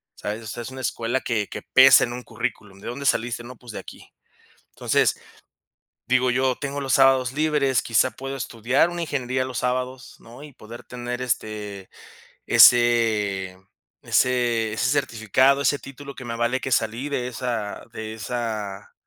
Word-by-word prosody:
¿sabes? 110 Hz, +2 st, -5 dB
O -, -, -9 dB
sea, 120 Hz, +3 st, -6 dB
es -, -, -7 dB
una 130 Hz, 0 st, -8 dB
escuela 120 Hz, +1 st, -1 dB
que 110 Hz, -4 st, -1 dB
que -, -, -7 dB
pesa 130 Hz, 0 st, +7 dB
en 120 Hz, -, -6 dB
un 125 Hz, -, -6 dB
currículum. 105 Hz, -3 st, -5 dB
"¿De -, -, -9 dB
dónde 140 Hz, +4 st, -6 dB
saliste?", 120 Hz, -2 st, 0 dB
"No, 125 Hz, +1 st, -10 dB
pues 120 Hz, -1 st, -12 dB
de -, -, -5 dB
aquí". -, -, -13 dB, 0.6 s
Entonces, -, -, +1 dB, 0.9 s
digo, 130 Hz, 0 st, +3 dB
yo 130 Hz, 0 st, +1 dB
tengo 140 Hz, 0 st, -4 dB
los 135 Hz, -2 st, -1 dB
sábados 130 Hz, -2 st, +4 dB
libres, 145 Hz, -4 st, +1 dB
quizá 120 Hz, +2 st, +2 dB
puedo 135 Hz, +1 st, -6 dB
estudiar 120 Hz, +6 st, +1 dB
una 175 Hz, 0 st, -4 dB
ingeniería 130 Hz, -4 st, -2 dB
los 130 Hz, -3 st, -4 dB
sábados, 125 Hz, +1 st, -3 dB
¿no? 120 Hz, +5 st, -13 dB
Y 150 Hz, -2 st, -12 dB
poder 115 Hz, +1 st, -11 dB
tener 125 Hz, 0 st, -5 dB
este 105 Hz, -5 st, -4 dB, 0.6 s
ese 110 Hz, -6 st, +4 dB, 0.5 s
ese 120 Hz, -3 st, +1 dB
ese 110 Hz, -, 0 dB
certificado, 130 Hz, 0 st, +2 dB
ese 140 Hz, +1 st, +2 dB
título 140 Hz, +1 st, -10 dB
que 130 Hz, -, -9 dB
me 115 Hz, -, -4 dB
avale 120 Hz, +2 st, 0 dB
que 130 Hz, -, -4 dB
salí 115 Hz, +5 st, 0 dB
de 125 Hz, -3 st, -2 dB
esa 115 Hz, -4 st, -4 dB
de 110 Hz, -1 st, -6 dB
esa 110 Hz, -4 st, -5 dB
125 Hz, 165 wpm, -23 LUFS, 115-130 Hz, 0.9 s, pesa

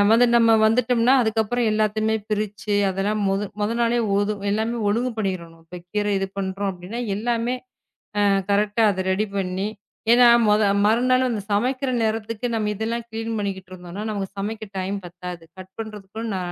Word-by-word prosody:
அது 245 Hz, +2 st, +6 dB
நம்ம 230 Hz, -1 st, +5 dB
வந்துட்டோம்னா 240 Hz, +2 st, +3 dB
அதுக்கப்புறம் 220 Hz, +1 st, +1 dB
எல்லாத்தையுமே 215 Hz, +1 st, +1 dB
பிரிச்சு 210 Hz, 0 st, -2 dB, 0.2 s
அதெல்லாம் 200 Hz, +3 st, -1 dB
மொத 195 Hz, +1 st, 0 dB, 0.2 s
மொத 210 Hz, +2 st, +1 dB
நாளே 235 Hz, +1 st, +2 dB, 0.5 s
எல்லாம் 220 Hz, +3 st, 0 dB, 0.2 s
ஒழுங்கு 240 Hz, +4 st, 0 dB
பண்ணிறனும். 170 Hz, -5 st, -4 dB
இப்ப 180 Hz, +2 st, -9 dB
கீரை 205 Hz, -1 st, 0 dB, 0.2 s
பண்றோம் 195 Hz, +1 st, -2 dB
அப்படின்னா 185 Hz, +7 st, -7 dB, 0.2 s
எல்லாமே 235 Hz, +2 st, 0 dB, 0.6 s
அ -, -, +3 dB, 0.3 s
கரெக்ட்டா 210 Hz, +2 st, +2 dB
அது 190 Hz, -, -2 dB
ரெடி 205 Hz, +3 st, +1 dB
பண்ணி. 190 Hz, +1 st, -1 dB, 0.4 s
ஏன்னா 245 Hz, 0 st, +7 dB, 0.2 s
மொத 210 Hz, +1 st, +4 dB, 0.2 s
மறுநாள் 255 Hz, +4 st, +3 dB, 0.3 s
சமைக்கிற 255 Hz, +6 st, 0 dB
நேரத்துக்கு 220 Hz, +1 st, -2 dB
நாம 215 Hz, -2 st, 0 dB
இதெல்லாம் 230 Hz, +3 st, -2 dB
க்ளீன் 225 Hz, 0 st, -4 dB
பண்ணிக்கிட்டு 190 Hz, -2 st, -4 dB
இருந்தோம். 180 Hz, +1 st, -9 dB
நமக்குச் 200 Hz, -1 st, -4 dB
சமைக்க 215 Hz, +2 st, -4 dB
டைம் 190 Hz, +2 st, -2 dB
பத்தாது. 175 Hz, -1 st, -8 dB
கட் 185 Hz, 0 st, -11 dB
பண்றதுக்கும் 220 Hz, +1 st, -6 dB
ந -, -, -1 dB
210 Hz, 145 wpm, -23 LUFS, 195-230 Hz, 0.6 s, ஏன்னா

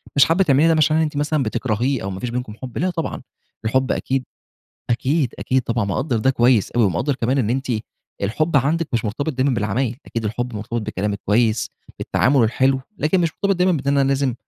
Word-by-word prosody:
مش 140 Hz, -, +7 dB
حابة 170 Hz, +4 st, +3 dB
تعمليها 150 Hz, -1 st, +4 dB
ده 165 Hz, -, +4 dB
مش 155 Hz, 0 st, +3 dB
إن 155 Hz, -, +3 dB
أنتِ 155 Hz, -2 st, 0 dB
مثلًا 150 Hz, 0 st, +1 dB
بتكرهيه 120 Hz, +2 st, -1 dB
أو 100 Hz, -, -3 dB
ما 95 Hz, -1 st, -5 dB
فيش 125 Hz, -, -3 dB
بينكم 125 Hz, -2 st, -4 dB
حب 130 Hz, -2 st, -7 dB
لأ، 185 Hz, -, +1 dB
طبعًا 170 Hz, -3 st, -4 dB, 0.4 s
الحب 130 Hz, +4 st, +1 dB
أكيد 135 Hz, 0 st, -1 dB, 0.7 s
أكيد، 130 Hz, +4 st, +1 dB
أكيد 130 Hz, 0 st, 0 dB
طبعًا 115 Hz, -2 st, -1 dB
مقدّر 120 Hz, +5 st, -1 dB
ده 130 Hz, +5 st, +3 dB
كويس 120 Hz, -4 st, +3 dB
أوي 120 Hz, -1 st, +3 dB
ومقدر 95 Hz, -, 0 dB
كمان 130 Hz, +2 st, 0 dB
إن 115 Hz, -4 st, +1 dB
أنتِ 135 Hz, +3 st, -1 dB, 0.6 s
الحب 150 Hz, +11 st, 0 dB
عندِك 155 Hz, +5 st, +1 dB
مش 115 Hz, -1 st, 0 dB
مرتبط 140 Hz, +9 st, -2 dB
دايمًا 130 Hz, +1 st, +1 dB
بالعمايل 115 Hz, +3 st, -1 dB
أكيد 115 Hz, -1 st, -4 dB
الحب 120 Hz, +3 st, -3 dB
مرتبط 110 Hz, +3 st, -3 dB
بالكلام 105 Hz, 0 st, -2 dB
الكويس 110 Hz, +3 st, +1 dB, 0.3 s
بالتعامل 135 Hz, -1 st, +2 dB
الحلو، 130 Hz, +4 st, +2 dB, 0.2 s
لكن 165 Hz, +5 st, +2 dB
مش 170 Hz, -2 st, +1 dB
مرتبط 200 Hz, 0 st, 0 dB
دايمًا 180 Hz, +1 st, +3 dB
بأننا 140 Hz, -2 st, +1 dB
لازم 135 Hz, -2 st, +1 dB
130 Hz, 200 wpm, -21 LUFS, 115-145 Hz, 0.7 s, مش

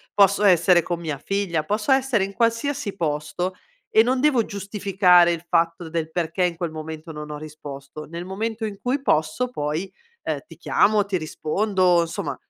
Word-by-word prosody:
posso 200 Hz, 0 st, +4 dB
essere 180 Hz, -2 st, +5 dB
con 175 Hz, +1 st, -3 dB
mia 155 Hz, -5 st, -4 dB
figlia, 195 Hz, -4 st, -1 dB
posso 210 Hz, -, -1 dB
essere 265 Hz, -6 st, +3 dB
in 195 Hz, -, -4 dB
qualsiasi 230 Hz, -1 st, 0 dB
posto 160 Hz, +2 st, -2 dB, 0.4 s
e 220 Hz, -, +6 dB
non 255 Hz, +3 st, +1 dB
devo 260 Hz, -5 st, +3 dB
giustificare 195 Hz, -3 st, +3 dB
il 170 Hz, 0 st, -4 dB
fatto 170 Hz, 0 st, 0 dB
del 160 Hz, -1 st, -2 dB
perché 170 Hz, +2 st, -1 dB
in 175 Hz, -1 st, +1 dB
quel 170 Hz, -2 st, -3 dB
momento 160 Hz, +1 st, -7 dB
non 150 Hz, -1 st, -7 dB
ho 150 Hz, -, -5 dB
risposto. 150 Hz, -1 st, -9 dB
Nel 170 Hz, +2 st, -7 dB
momento 220 Hz, +4 st, -3 dB
in 200 Hz, -2 st, -6 dB
cui 255 Hz, +3 st, 0 dB
posso 250 Hz, -, 0 dB
poi, 155 Hz, +2 st, -3 dB, 0.3 s
ehm, -, -, -2 dB
ti -, -, -14 dB
chiamo, 210 Hz, -1 st, +2 dB
ti 200 Hz, -2 st, -1 dB
rispondo, 180 Hz, +2 st, +1 dB
insomma 165 Hz, -, -3 dB
180 Hz, 175 wpm, -23 LUFS, 160-210 Hz, 0.4 s, e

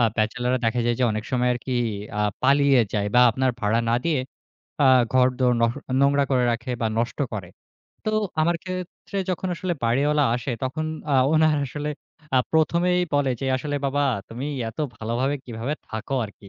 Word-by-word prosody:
আ -, -, +4 dB
ব্যাচেলররা 125 Hz, +3 st, 0 dB
দেখা 120 Hz, +2 st, +1 dB
যায় 120 Hz, -, +2 dB
যে 125 Hz, -, +4 dB
অনেক 110 Hz, 0 st, -3 dB
সময় 125 Hz, -1 st, +2 dB
আরকি 125 Hz, +2 st, -5 dB, 0.5 s
আ -, -, +1 dB, 0.2 s
পালিয়ে 140 Hz, -1 st, +5 dB
যায়। 105 Hz, -2 st, 0 dB
বা 125 Hz, -, +7 dB
আপনার 130 Hz, +3 st, +1 dB
ভাড়া 110 Hz, +2 st, +2 dB
না 115 Hz, -, +3 dB
দিয়ে 155 Hz, -6 st, +1 dB, 0.6 s
আ -, -, +6 dB, 0.3 s
ঘরদোর 125 Hz, -1 st, +3 dB
নহ 115 Hz, 0 st, +3 dB, 0.3 s
নোংরা 140 Hz, 0 st, +4 dB
করে 125 Hz, -2 st, +3 dB
রাখে 120 Hz, +2 st, -4 dB
বা -, -, +2 dB
নষ্ট 120 Hz, +1 st, -2 dB
করে। 95 Hz, -5 st, -5 dB, 0.6 s
তো -, -, +2 dB, 0.3 s
আমার 170 Hz, +1 st, +2 dB
ক্ষেত্রে 185 Hz, +1 st, -6 dB
যখন 185 Hz, +1 st, -2 dB
আসলে 175 Hz, 0 st, -2 dB
বাড়িওয়ালা 145 Hz, +5 st, +2 dB
আসে, 125 Hz, +3 st, -3 dB
তখন 155 Hz, +5 st, -2 dB, 0.3 s
আ -, -, +4 dB, 0.2 s
উনার 155 Hz, -1 st, +4 dB
আসলে 150 Hz, +3 st, -4 dB, 0.5 s
আ -, -, +7 dB
১ম 160 Hz, +2 st, +3 dB
এই 180 Hz, -, +2 dB
বলে 145 Hz, -2 st, +2 dB
যে, 135 Hz, -, -2 dB
"আসলে 145 Hz, +2 st, -3 dB
বাবা 145 Hz, +1 st, 0 dB, 0.3 s
তুমি 125 Hz, +5 st, -5 dB, 0.2 s
এত -, -, -24 dB, 0.2 s
ভালোভাবে 120 Hz, +6 st, -1 dB
কিভাবে 120 Hz, +5 st, -4 dB
থাকো 110 Hz, +5 st, -4 dB
আরকি।" 100 Hz, -1 st, -12 dB
130 Hz, 180 wpm, -24 LUFS, 120-145 Hz, 0.6 s, বা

